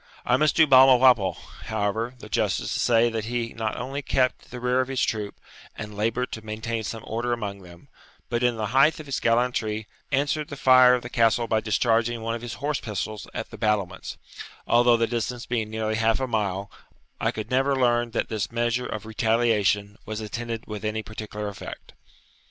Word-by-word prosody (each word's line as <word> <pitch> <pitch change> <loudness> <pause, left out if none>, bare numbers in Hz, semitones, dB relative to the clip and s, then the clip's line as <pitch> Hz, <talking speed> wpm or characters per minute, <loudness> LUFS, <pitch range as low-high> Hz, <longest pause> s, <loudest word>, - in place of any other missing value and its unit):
I 125 - +3
must 150 +3 +2
do 160 - +6
Balmawhapple, 130 -6 +6 0.3
however, 110 +3 -2
the - - -11
justice - - -1
to - - -2
say 120 0 +3
that 110 -1 -3
he 120 0 -3
not 110 -1 -3
only 135 +4 -4
kept 130 -2 0
the 125 - -7
rear 125 +1 +2
of 130 - -3
his 135 -1 -1
troop, 105 -2 -3 0.4
and 105 -1 -7
laboured 115 +4 -1
to 110 - -6
maintain 110 +1 -3
some 110 +1 -5
order 120 +2 -2
among 100 -4 -4
them, 85 -1 -15 0.4
but, 120 0 -1
in 125 -1 +2
the 110 -1 -2
height 140 +5 +4
of 155 - -8
his 140 -2 -2
gallantry, 115 -2 0 0.3
answered 145 +2 0
the 140 - -8
fire 130 -1 +7
of 125 - -4
the - - -6
Castle 115 0 +3
by 110 -1 +1
discharging 115 +1 +1
one 115 0 -2
of 115 - -4
his 120 -1 -6
horse 145 0 -2
pistols 105 -1 -5
at - - -5
the - - -10
battlements; 100 -4 -1 0.5
although, 120 0 +4
the 115 - +2
distance 120 +1 -3
being 115 -3 -2
nearly 110 0 -2
half 115 +1 +2
a 130 - 0
mile, 100 -4 -2 0.5
I - - +1
could 110 +2 -5
never 135 +2 +2
learn 120 -2 +2
that - - -2
this 105 -2 -3
measure 120 +1 0
of 110 0 -5
retaliation 110 -2 +1
was 110 0 -5
attended 115 +1 -5
with 105 -1 -7
any 110 0 -2
particular 105 -1 -6
effect. 100 -1 -9
115 Hz, 195 wpm, -25 LUFS, 110-125 Hz, 0.5 s, fire